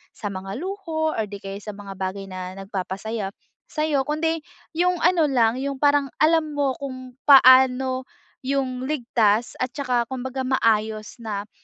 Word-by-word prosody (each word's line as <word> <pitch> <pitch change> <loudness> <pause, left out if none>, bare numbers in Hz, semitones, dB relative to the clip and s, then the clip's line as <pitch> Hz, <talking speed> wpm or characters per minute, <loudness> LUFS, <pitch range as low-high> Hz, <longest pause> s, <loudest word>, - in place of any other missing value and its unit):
sa 210 - -5
mga 195 +1 -6
luho, 330 -4 -2
or 220 - 0
di 205 - -8
kaya 195 0 -6
sa 210 -2 -7
mga 200 -1 -8
bagay 195 +1 -4
na 185 0 -6
nagpapasaya 195 +2 -4 0.4
sa'yo, 305 -3 0
kundi 320 +2 -1 0.4
yung 360 0 +2
ano 345 -1 +4
lang, 235 -3 +3
yung 275 0 -4
parang, 285 -1 +3
alam 310 -1 +3
mo 285 -2 +1
kung 255 -2 -8
paano 260 -1 +6 0.4
yung 260 -2 -1
ligtas 235 -6 +1
at 255 0 -2
tsaka 250 -4 0
kumbaga 260 0 -4
maayos 220 -4 0
na 210 -2 -4
255 Hz, 150 wpm, -23 LUFS, 215-290 Hz, 0.4 s, paano